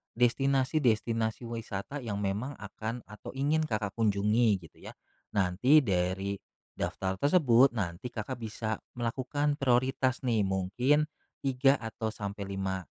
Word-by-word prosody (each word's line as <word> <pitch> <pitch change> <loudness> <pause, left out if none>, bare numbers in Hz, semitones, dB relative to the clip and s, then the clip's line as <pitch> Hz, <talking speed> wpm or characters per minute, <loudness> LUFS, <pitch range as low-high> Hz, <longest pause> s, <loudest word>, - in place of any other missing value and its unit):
destinasi-destinasi 120 -3 +1
wisata 115 +4 -5
yang 105 -4 -3
memang 105 +8 -2
akan 110 +4 -5
atau 105 0 -9
ingin 145 +4 +1
Kakak 105 -8 -2
kunjungi, 110 +1 +3 0.2
gitu - - -29
ya. - - -7 0.4
Nanti 100 +10 +4
dari 95 -3 0 0.4
daftar 95 0 -2
tersebut, 135 - +5
nanti 100 +2 -4
Kakak 115 +4 -4
bisa 110 -1 -3 0.2
melakukan 140 +5 0
prioritas 130 -1 +2
nih, 110 -4 +3
mungkin 110 +11 +1 0.4
3 135 +1 +3
atau 110 -1 -4
sampai 100 -1 -5
5, 95 -1 -3
115 Hz, 120 wpm, -30 LUFS, 100-130 Hz, 0.4 s, tersebut